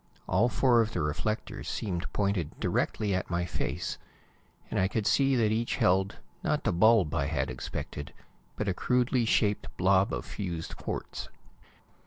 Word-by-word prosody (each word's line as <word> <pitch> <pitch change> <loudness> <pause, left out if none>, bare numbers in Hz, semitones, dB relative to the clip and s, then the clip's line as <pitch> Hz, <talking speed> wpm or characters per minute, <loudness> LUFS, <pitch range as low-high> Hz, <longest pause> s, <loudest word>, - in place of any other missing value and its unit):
All 105 +6 +3
four 120 -2 +4
of 115 0 -1
the 90 - -1
reflectors 90 +9 -2
seemed 90 -5 -3
pointed 100 -6 -1
directly 105 -2 0
at 95 - -1
my 85 0 0
face, - - -3 0.7
and - - 0
I 95 - +3
could 105 +1 -2
see 135 +3 +3
that 110 -3 +3
each 115 +2 0
held, 95 +2 +2 0.3
not - - 0
the - - +1
bulb 100 -3 +5
I 70 -4 +1
had 70 -5 -1
expected, 70 +3 -6 0.4
but 105 - -3
a 95 - +2
crudely 125 +3 +1
shaped 105 -2 +2
blob 95 +3 +4
of - - -3
fused 85 -5 -5
quartz. - - -5
100 Hz, 160 wpm, -29 LUFS, 90-115 Hz, 0.7 s, bulb